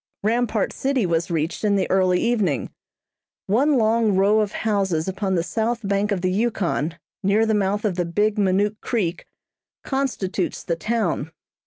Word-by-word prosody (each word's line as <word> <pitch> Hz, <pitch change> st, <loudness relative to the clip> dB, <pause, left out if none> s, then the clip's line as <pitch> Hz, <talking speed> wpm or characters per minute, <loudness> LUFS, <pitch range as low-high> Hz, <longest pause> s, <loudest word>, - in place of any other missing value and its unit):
Rampart 225 Hz, -1 st, 0 dB
City 265 Hz, -5 st, 0 dB
was 170 Hz, 0 st, 0 dB
reached 165 Hz, +2 st, -2 dB
in 205 Hz, -1 st, +3 dB
the 195 Hz, -, +1 dB
early 185 Hz, -1 st, +3 dB
evening. 210 Hz, -, 0 dB, 0.7 s
One 265 Hz, +8 st, +3 dB
long 220 Hz, -2 st, +2 dB
row 200 Hz, +3 st, +4 dB
of 210 Hz, -1 st, 0 dB
houses 195 Hz, -8 st, 0 dB
upon 190 Hz, 0 st, -1 dB
the 170 Hz, -, +1 dB
south 225 Hz, +2 st, -2 dB
bank 200 Hz, +1 st, 0 dB
of 195 Hz, -3 st, 0 dB
the 185 Hz, 0 st, +1 dB
Yukon, 185 Hz, -6 st, -1 dB, 0.2 s
near 205 Hz, +3 st, +3 dB
the 220 Hz, -, +1 dB
mouth 205 Hz, +1 st, 0 dB
of 190 Hz, -4 st, 0 dB
the 175 Hz, -, 0 dB
Big 210 Hz, +5 st, 0 dB
Minook 205 Hz, +2 st, +1 dB
Creek 195 Hz, -8 st, -2 dB, 0.6 s
constitutes 220 Hz, -9 st, -2 dB
the 170 Hz, -, -1 dB
town. 175 Hz, -6 st, -1 dB
200 Hz, 160 wpm, -23 LUFS, 185-220 Hz, 0.7 s, row